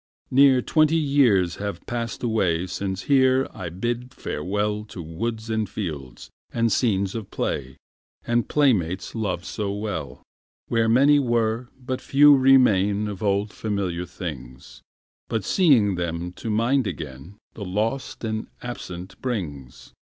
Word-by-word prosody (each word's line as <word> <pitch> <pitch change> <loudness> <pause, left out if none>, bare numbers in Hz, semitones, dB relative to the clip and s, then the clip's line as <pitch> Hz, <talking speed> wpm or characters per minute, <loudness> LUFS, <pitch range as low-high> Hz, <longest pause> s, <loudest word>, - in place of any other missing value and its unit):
Near 130 -1 +5
twenty 155 0 +3
years 130 - +3
have 100 0 -5
passed 120 0 -4
away 95 -7 +1
Since 95 +1 -4
here 130 -1 +3
I 90 -2 -6
bid 120 +8 -3
farewll 105 +6 -2
To 90 -4 -8
woods 110 +8 -4
and 110 -2 -1
fields, 75 - -6 0.2
and 115 -1 +1
scenes 100 -4 +1
of 110 -4 -6
play, 65 +1 -3 0.5
And 120 0 0
playmates 100 - +1
loved 105 -6 -2
so 105 -2 -3
well. 100 -11 -5 0.5
Where 115 -1 +2
many 140 +5 +5
were, 120 -2 0
but 130 0 -4
few 145 +1 +6
remain 105 -7 +4
Of 100 -2 -6
old 100 0 0
familiar 95 -5 -3
things, 65 -8 -8 0.5
But 110 -3 -1
seeing 130 - +4
them 85 0 -3
to 110 - -7
mind 115 +3 +2
again 80 0 -7 0.2
The 105 - -7
lost 110 +10 -2
and 110 -1 -3 0.2
absent 95 -7 -7
brings. 75 - -5
105 Hz, 135 wpm, -24 LUFS, 90-120 Hz, 0.5 s, few